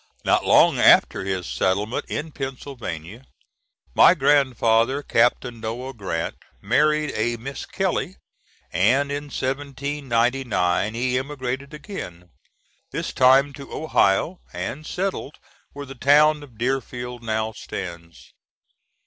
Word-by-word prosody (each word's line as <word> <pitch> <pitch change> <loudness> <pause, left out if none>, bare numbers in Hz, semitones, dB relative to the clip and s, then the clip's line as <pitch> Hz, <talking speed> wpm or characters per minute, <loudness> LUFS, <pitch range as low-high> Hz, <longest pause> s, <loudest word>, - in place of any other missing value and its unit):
Not - - +3
long - - +5
after - - +5
his 95 -2 -3
settlement 100 +7 -1
in 155 +1 -4
Pennsylvania, 125 - -7 0.7
my - - +7
grandfather, 130 -1 +2
Captain 120 -2 +1
Noah 120 +4 -5
Grant, 95 -7 -4 0.2
married 150 +6 +2
a 120 +2 0
Miss 135 +5 -7
Kelly, 190 -1 -2 0.6
and 130 +11 +2
in 145 +1 -3
1799 130 -8 -1
he 125 +1 0
emigrated 135 -1 -5
again, 90 - -9 0.6
this - - -4
time 135 +2 +5
to 140 0 -11
Ohio, 155 - +1
and 100 - -5
settled 185 -6 -3 0.4
where 145 0 -7
the 135 - -9
town 150 +3 +4
of 130 -6 -14
Deerfield 125 -1 -3
now 110 -1 -2
stands. 85 -5 -8
130 Hz, 110 wpm, -23 LUFS, 110-140 Hz, 0.7 s, my